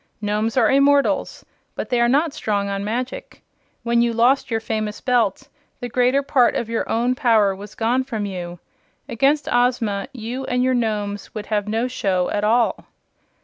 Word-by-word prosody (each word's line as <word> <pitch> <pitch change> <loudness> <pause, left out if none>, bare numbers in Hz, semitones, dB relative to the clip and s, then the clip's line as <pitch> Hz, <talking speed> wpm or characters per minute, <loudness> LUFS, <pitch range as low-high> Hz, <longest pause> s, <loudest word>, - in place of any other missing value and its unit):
"Nomes 215 +3 -1
are - - +4
immortals, 280 +1 +2 0.3
but - - -5
they 245 -2 +1
are 235 - +3
not 290 +4 +2
strong 200 -2 -2
on 200 0 -3
magic. 240 +5 -5 0.4
When 235 0 +2
you 235 0 +1
lost 245 +4 +2
your 225 -2 0
famous 215 -1 -3
Belt 240 -5 0 0.3
the 245 - -5
greater 250 +3 +2
part 270 -3 +3
of 230 - -2
your 230 - -2
own 240 +2 +1
power 225 -7 +2
was 200 +1 -11
gone 240 +3 +1
from 225 -5 -4
you. 175 -3 -6 0.5
Against 275 +6 +1
Ozma 245 -4 +1
you 250 +1 -5
and 250 0 0
your 260 0 +2
Nomes 210 -4 -2
would 210 -1 -5
have 205 -1 0
no 225 +3 0
show 190 -8 -1
at 205 - -1
all." 230 +3 +1
230 Hz, 175 wpm, -21 LUFS, 210-250 Hz, 0.5 s, are